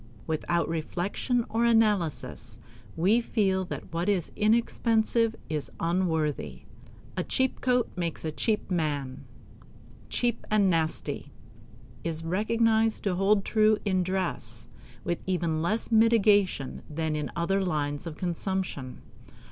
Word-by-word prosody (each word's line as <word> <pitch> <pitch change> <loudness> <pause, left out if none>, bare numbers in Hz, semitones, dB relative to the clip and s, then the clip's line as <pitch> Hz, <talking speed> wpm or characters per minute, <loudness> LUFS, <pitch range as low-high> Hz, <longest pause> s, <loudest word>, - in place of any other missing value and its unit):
Without 165 +2 0
reflection 180 +9 -1
or 230 +1 0
analysis, 215 -8 +1 0.4
we 200 +8 +3
feel 195 -5 +1
that 175 - -7
what 170 +4 0
is 190 -5 0
inexpensive 225 +1 +2
is 155 -2 -3
unworthy. 165 -4 -1 0.5
"A 180 - -1
cheap 260 +6 0
coat 250 -1 +2
makes 170 -3 -3
a 155 - -1
cheap 210 +5 -1
man." 145 -6 -2 0.8
"Cheap 240 -2 0
and 205 -3 +4
nasty" 155 -3 -1 0.7
is 165 -1 -3
recognized 220 +4 +2
to 195 - +1
hold 195 +2 +2
true 215 -1 +4
in 185 -2 +2
dress 170 - -3 0.4
with 175 -1 -1
even 170 -4 0
less 215 +8 0
mitigation 210 - +3
than 155 0 -2
in 150 -1 -2
other 195 +3 +1
lines 150 -2 -2
of 155 - -7
consumption. 175 -7 -3
185 Hz, 120 wpm, -28 LUFS, 160-215 Hz, 0.8 s, and